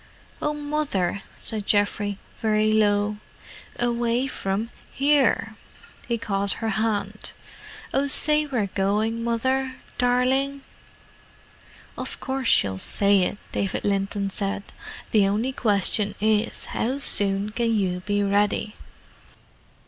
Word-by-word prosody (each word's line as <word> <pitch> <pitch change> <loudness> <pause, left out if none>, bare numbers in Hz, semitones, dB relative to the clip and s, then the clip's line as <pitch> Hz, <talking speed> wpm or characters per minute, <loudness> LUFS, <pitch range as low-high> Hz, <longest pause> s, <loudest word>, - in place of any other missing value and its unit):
"Oh, 300 0 -1
Mother!" 290 -11 -2
said 215 -2 -3
Geoffrey, 205 -1 +1 0.2
very 215 -1 +2
low. 210 -1 +2 0.6
"Away 240 +1 0
from—here!" 265 +6 0 0.5
He 235 - 0
caught 200 -3 -1
her 225 - -3
hand. 210 -1 -2 0.6
"Oh, 275 +1 +1
say 300 +2 +5
we're 245 -7 0
going, 210 +4 -1
Mother—darling!" 260 +2 0 1.3
"Of - - -5
course 265 -1 -3
she'll 95 - +3
say 200 - +3
it," 180 - -1
David 195 - -2
Linton 200 0 -1
said. 200 0 -2 0.5
"The 205 -3 +4
only 215 +6 0
question 205 -3 +2
is, 215 +1 +1
how 255 +4 -1
soon 200 -6 +3
can 230 +1 0
you 190 -5 0
be 205 +2 -1
ready?" 205 +1 +1
215 Hz, 105 wpm, -24 LUFS, 200-250 Hz, 1.3 s, say